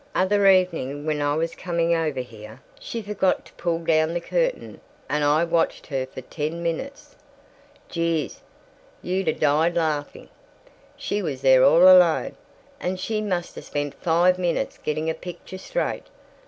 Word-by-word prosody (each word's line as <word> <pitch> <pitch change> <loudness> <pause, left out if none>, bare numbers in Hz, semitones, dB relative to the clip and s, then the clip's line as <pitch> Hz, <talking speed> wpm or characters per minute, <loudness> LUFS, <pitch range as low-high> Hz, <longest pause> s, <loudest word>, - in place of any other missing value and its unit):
Other 200 +1 +3
evening 165 -7 +2
when 155 -1 -1
I 145 0 +1
was 165 +1 -1
coming 170 -1 -1
over 155 -5 -1
here, 110 -3 -12 0.2
she'd 230 -3 -6
forgot 200 -2 0
to - - -18
pull 170 -1 -1
down 165 0 +1
the - - +1
curtain, - - -2 0.3
and 150 0 0
I 150 +3 +3
watched 165 -1 0
her 135 -3 -3
for - - -9
ten 160 +2 -5
minutes. 270 - -5 0.7
Jeeze, 165 -3 -2 0.6
you'd 185 +1 -2
'a' 155 - +3
died 155 +3 +2
laughing. 155 -3 -2 0.7
She 205 - -2
was 145 -8 -4
there 130 -1 +6
all 170 - +6
alone, 180 -3 +6 0.4
and 185 +1 -3
she 215 +3 -2
must 180 -4 -3
'a' - - -6
spent 145 -1 -4
five 175 +4 +2
minutes 175 -2 -1
getting 155 +1 -2
a 160 - +1
picture 180 +2 -9
straight. - - -3
165 Hz, 155 wpm, -24 LUFS, 150-185 Hz, 0.7 s, there